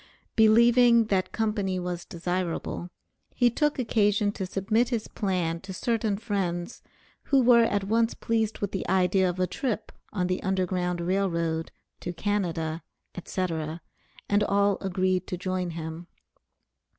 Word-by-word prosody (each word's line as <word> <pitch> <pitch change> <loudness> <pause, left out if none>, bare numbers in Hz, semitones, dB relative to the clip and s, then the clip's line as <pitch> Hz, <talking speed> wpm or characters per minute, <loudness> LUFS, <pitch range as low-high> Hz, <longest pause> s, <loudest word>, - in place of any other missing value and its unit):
Believing 235 +1 +6
that 185 -1 0
company 210 -4 -1
was 175 -1 -4
desirable, 175 0 -3 0.5
he 245 -1 +4
took 295 +4 +1
occasion 210 -4 +2
to 190 -2 -5
submit 215 +6 +1
his 230 -4 -2
plan 180 -5 -1
to 190 0 -8
certain 220 0 0
friends, 195 -3 -3 0.4
who 275 - +3
were 240 -2 +6
at 205 -3 0
once 225 +3 +1
pleased 220 -1 -1
with 205 - -1
the 195 - -3
idea 185 0 +3
of 180 +1 -4
a 185 - +3
trip 225 0 -3 0.2
on 185 -3 -1
the 180 0 -1
Underground 180 -2 -1
Rail 190 +3 +1
Road, 165 -1 -2 0.3
to 175 - -5
Canada, 170 -4 -2 0.3
etc; 165 -3 -3 0.5
and 205 0 +3
all 200 -1 +2
agreed 185 -1 0
to 180 - -3
join 185 0 -2
him. 165 +1 -6
190 Hz, 140 wpm, -27 LUFS, 180-215 Hz, 0.5 s, Believing